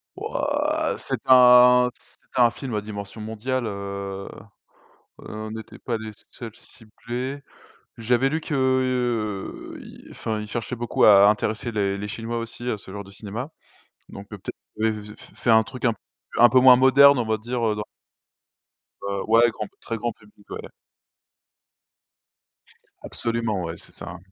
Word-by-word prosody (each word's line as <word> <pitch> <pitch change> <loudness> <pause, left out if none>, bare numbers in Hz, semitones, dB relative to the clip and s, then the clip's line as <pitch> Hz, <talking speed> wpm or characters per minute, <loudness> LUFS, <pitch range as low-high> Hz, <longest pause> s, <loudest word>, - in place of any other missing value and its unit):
Wouah! - - -1
C'est - - -3
un 125 -1 +8
c'est - - -18 0.2
un 120 -2 +5
film 125 -1 -6
à 105 - -1
dimension 100 +1 -8
mondiale, 115 +4 -3
heu, 100 -1 -5 0.9
on 110 0 -7
n'était 110 0 -9
pas 120 -2 -2
les 110 0 -7 0.2
seuls 115 -3 -9
ciblés. 125 +5 -7 0.6
J'avais 120 +3 +2
lu 160 +2 -1
que, 155 - -4
heu, 125 -6 -1 0.3
enfin 110 -1 -4
il 105 - -7
cherchait 120 +3 -4
beaucoup 120 0 +1
à 100 -1 +8
intéresser 110 +2 0
les 100 -2 0
les 105 +1 -5
Chinois 115 +3 -4
aussi 115 +1 -6
à 110 - -2
ce 95 - -13
genre 100 +1 -7
de 95 - -14
cinéma. 105 +7 -6 0.6
Donc 100 0 -10
peut-être 105 -3 -8 0.6
f - - -16
fait - - -2
un 110 0 +6
truc 125 +1 -7
un 115 - +3
peu - - -22 0.4
un 120 +1 +8
peu 130 +2 +5
moins 125 0 +8
moderne 140 +2 +7
on 120 - 0
va 110 0 0
dire, 120 +2 -3
heu, 110 -1 +1
dans 105 - -3 1.2
Heu, 100 -1 -2
ouais, 115 +2 +5
grand, 105 -1 -6
très 115 - -4
grand 120 +2 -2
public 105 -1 -23
ouais. - - -5 2.4
Absolument 115 -5 -2
ouais, 85 0 -6
c'est - - -9
ça. 85 - -8
110 Hz, 155 wpm, -24 LUFS, 105-125 Hz, 2.4 s, un